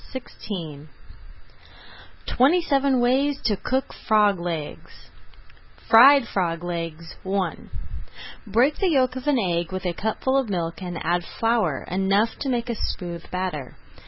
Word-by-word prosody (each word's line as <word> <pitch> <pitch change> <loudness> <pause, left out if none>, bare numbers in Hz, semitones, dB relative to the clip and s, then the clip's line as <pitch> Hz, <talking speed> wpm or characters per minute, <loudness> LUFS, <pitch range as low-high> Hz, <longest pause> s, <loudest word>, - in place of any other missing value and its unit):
[Page 260 -1 -5 0.3
151] 155 -6 -6 1.4
TWENTY 290 +8 +3
SEVEN 275 -4 +2
WAYS 270 +3 +2
TO 215 - +2
COOK 260 +7 -2
FROG 210 -3 +2
LEGS 165 -4 -6 0.8
FRIED 265 +2 +7
FROG 170 -4 -2
LEGS 165 -2 -5
I 190 0 -1 1.0
Beat 255 +8 +3
the 385 - +1
yolk 260 -5 +2
of 260 +2 -7
an 290 -2 +3
egg 175 -5 -1
with 185 0 -5
a 175 - 0
cupful 220 +8 0
of 260 -5 -3
milk 170 -2 -3
and 175 -2 -5
add 175 +1 +1
flour 220 - 0
enough 195 +4 +1
to 275 - -3
make 240 -1 -1
a - - -3
smooth 175 -5 -5
batter. 180 -8 -4
200 Hz, 140 wpm, -24 LUFS, 175-255 Hz, 1.4 s, FRIED